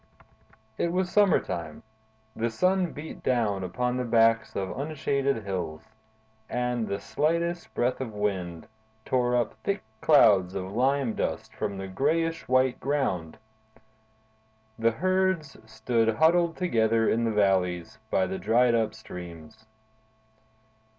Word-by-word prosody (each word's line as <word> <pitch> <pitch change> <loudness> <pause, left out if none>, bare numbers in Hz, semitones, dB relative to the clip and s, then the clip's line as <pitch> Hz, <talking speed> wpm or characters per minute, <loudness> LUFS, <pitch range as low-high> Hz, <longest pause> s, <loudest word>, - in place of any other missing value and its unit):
It 170 - +1
was 180 0 -1
summertime. 85 - +1 0.5
The 115 +1 -1
sun 185 +8 +1
beat 155 +2 -9
down 110 -6 0
upon 125 +7 -2
the 125 - -1
backs 115 -1 +3
of 95 -1 -3
unshaded 140 -3 -1
hills, 90 -5 -4 0.7
and 125 -2 -1
the 100 - -3
slightest 170 +3 -1
breath 125 +2 0
of 125 -4 -4
wind 95 -5 -3 0.4
tore 125 -1 +1
up 120 -3 0
thick 200 0 -1 0.2
clouds 100 - +5
of 95 0 -4
lime 130 0 +1
dust - - -3
from 100 -1 -4
the 95 0 -5
grayish 160 - -1
white 130 0 +2
ground. 125 - -1 1.4
The 115 0 +4
herds 185 +1 0 0.2
stood 115 0 +1
huddled 165 +4 +3
together 115 -10 +2
in 115 +1 +1
the 115 - +1
valleys, 95 -4 +1
by 95 - +2
the 95 +1 -4
dried 120 +2 +3
up 110 -2 0
streams. 90 +1 -11
115 Hz, 125 wpm, -27 LUFS, 100-145 Hz, 1.4 s, clouds